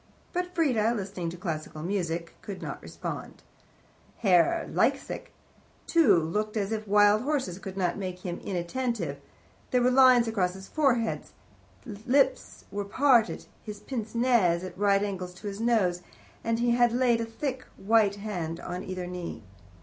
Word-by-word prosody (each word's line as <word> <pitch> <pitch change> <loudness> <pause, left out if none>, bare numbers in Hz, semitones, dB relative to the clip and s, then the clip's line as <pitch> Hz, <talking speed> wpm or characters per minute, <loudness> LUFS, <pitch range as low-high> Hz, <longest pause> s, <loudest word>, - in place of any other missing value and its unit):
But 360 0 -3
Frieda, 240 -9 +2
listening 190 -4 -4
to 175 - -8
Classical 155 -3 -5
Music, 170 -3 -2
could 195 -2 -7
not - - -6
respond. - - -7 0.7
Herr 195 - +3
Liesecke, - - 0 0.6
too, 330 - +5
looked 210 +7 -1
as 200 0 -1
if 215 -1 -3
wild 205 +1 +5
horses 260 - -2
could 195 0 -8
not 180 0 0
make 185 -2 -4
him 175 -1 -3
inattentive; 180 - -3 0.5
there 250 -1 +2
were 250 - +4
lines 255 -2 +6
across 185 -5 0
his 190 0 -10
forehead, 250 -7 +1 0.6
his 215 0 -9
lips 265 +1 +1
were 205 0 -2
parted, 235 +2 +3 0.2
his 210 -2 -8
pince 225 -2 -5
nez 230 -8 +3
at 185 - -7
right 200 0 +3
angles 185 -3 -4
to 190 - -13
his 200 0 -4
nose, 205 -7 +2 0.4
and 230 0 0
he 240 +1 +2
had 240 0 +4
laid 240 -2 +3
a - - -1
thick, 255 +3 -4
white 210 -1 +3
hand 180 -6 -4
on 180 +1 -5
either 185 -1 -5
knee. 180 -8 -6
205 Hz, 155 wpm, -28 LUFS, 180-240 Hz, 0.7 s, lines